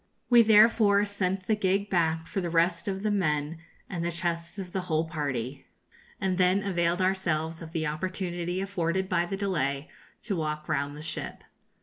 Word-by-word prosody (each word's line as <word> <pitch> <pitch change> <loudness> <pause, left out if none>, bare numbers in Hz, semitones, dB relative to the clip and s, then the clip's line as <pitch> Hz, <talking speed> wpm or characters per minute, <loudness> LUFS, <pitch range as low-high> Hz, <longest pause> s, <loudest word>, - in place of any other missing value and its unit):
We 240 -1 +9
therefore 215 -2 +5
sent 195 -2 -2
the 220 - +2
gig 200 0 +1
back 165 -3 +1
for 195 - -3
the 175 - -2
rest 170 +2 +1
of 195 0 -2
the 215 - +1
men 155 -5 0 0.3
and 175 -3 -4
the 170 - -1
chests 170 +1 -3
of 185 -2 -6
the 190 - -1
whole 160 -3 0
party, 140 -5 -4 0.5
and 185 -1 0
then 185 +2 +3
availed 175 -2 +1
ourselves 165 -4 0
of 160 -1 -8
the 165 -2 -1
opportunity 175 +2 -3
afforded 190 -1 -1
by 175 -2 +1
the 195 - -3
delay 155 -7 -1 0.3
to 210 -3 -2
walk 155 -2 -3
round 145 +1 -1
the 150 - -8
ship. 160 - -5
175 Hz, 180 wpm, -28 LUFS, 160-195 Hz, 0.5 s, We